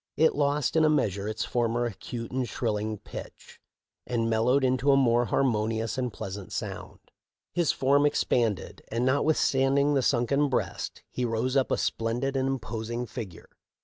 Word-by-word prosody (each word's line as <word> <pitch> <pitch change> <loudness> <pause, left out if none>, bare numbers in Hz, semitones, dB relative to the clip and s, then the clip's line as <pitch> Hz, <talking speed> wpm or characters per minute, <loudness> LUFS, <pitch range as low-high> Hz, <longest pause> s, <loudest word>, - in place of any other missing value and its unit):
It 160 +1 +4
lost 145 -1 0
in 160 - +5
a 155 - +5
meas 110 -11 +2
ure 100 0 -5
its 110 0 -2
former 120 0 0
acute 115 +1 -6
and 125 -2 -2
shrilling 110 -1 -2
pitch, - - -11 0.5
and 115 -2 0
mel 110 0 +1
lowed 135 +3 +3
into 130 +2 +3
a 135 - +5
more 120 -2 +3
harmonious 115 -3 0
and 125 -2 -2
pleasant 95 -1 -7
sound. - - -5 0.6
His 170 -3 +2
form 140 +2 +3
expanded, 115 -7 0
and, 115 +2 -1
notwithstanding 140 0 +2
the 135 - +3
sunken 140 +3 +2
breast, 130 - -3
he 125 - -3
rose 120 +2 -1
up 135 -2 +2
a - - +1
splendid 120 +5 -1
and 135 0 +1
imposing 120 -2 -3
figure. 110 -6 -8
125 Hz, 165 wpm, -27 LUFS, 115-135 Hz, 0.6 s, in